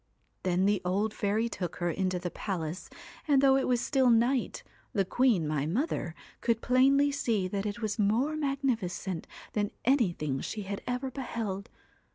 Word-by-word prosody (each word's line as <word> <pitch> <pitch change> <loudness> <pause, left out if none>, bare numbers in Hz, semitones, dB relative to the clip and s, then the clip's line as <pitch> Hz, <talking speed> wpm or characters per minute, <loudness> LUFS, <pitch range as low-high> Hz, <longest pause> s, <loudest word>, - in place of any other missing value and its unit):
' - - -44
Then 185 +1 +2
the 205 0 +2
old 200 +4 0
fairy 215 +3 0
took 180 -7 -4
her 175 -1 -1
into 185 +1 -1
the 175 -1 -4
palace, 175 -3 -4 0.4
and 285 -3 +5
though 270 0 +5
it 270 - +1
was 245 -1 +2
still 265 0 +2
night, 240 +2 +2 0.3
the 195 -5 +2
queen, 220 -7 +2
my 150 -1 0
mother, 180 - -1 0.3
could 230 -2 +1
plainly 275 +4 +4
see 230 -9 0
that 200 +2 -2
it 210 +3 -5
was 210 0 -2
more 230 +9 +2
magnificent 245 - -2 0.3
than 205 -1 0 0.2
anything 175 - +1
she 215 - -4
had 200 +1 -5
ever 250 +2 -2
beheld. 225 -7 -4
215 Hz, 170 wpm, -30 LUFS, 185-255 Hz, 0.4 s, and